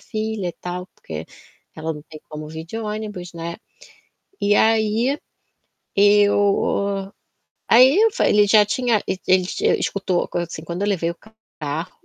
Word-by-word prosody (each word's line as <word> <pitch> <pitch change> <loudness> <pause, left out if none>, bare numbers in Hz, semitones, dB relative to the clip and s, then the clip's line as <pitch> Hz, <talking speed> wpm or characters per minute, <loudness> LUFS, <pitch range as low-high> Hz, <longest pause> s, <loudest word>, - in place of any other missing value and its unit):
filha, 215 -5 -3
tal, 180 +1 -5
porque 80 0 -7 0.5
ela 160 +1 -3
não 150 -1 -10
tem 155 -2 -11
como 150 0 -7
vir 160 +1 -7
de 170 +7 -8
ônibus". 210 -5 -5
Né. 170 0 -6 0.8
E 205 - +2
aí, 225 +5 +2 0.8
eu 200 -1 +3 0.6
ai, 250 +3 +8 0.2
eu 450 - +4
falei - - +2
ele 210 0 +5
já 210 0 +6
tinha 235 0 +1
e - - -1
ele 185 -1 +4
tinha - - +1
escutou, 185 -3 -1
coisa 175 - -2
assim, - - -6
quando 170 +3 -5
eu 205 - 0
levei 170 -4 0
o - - -11 0.4
carro, 155 +4 -4
195 Hz, 155 wpm, -21 LUFS, 170-215 Hz, 0.8 s, ai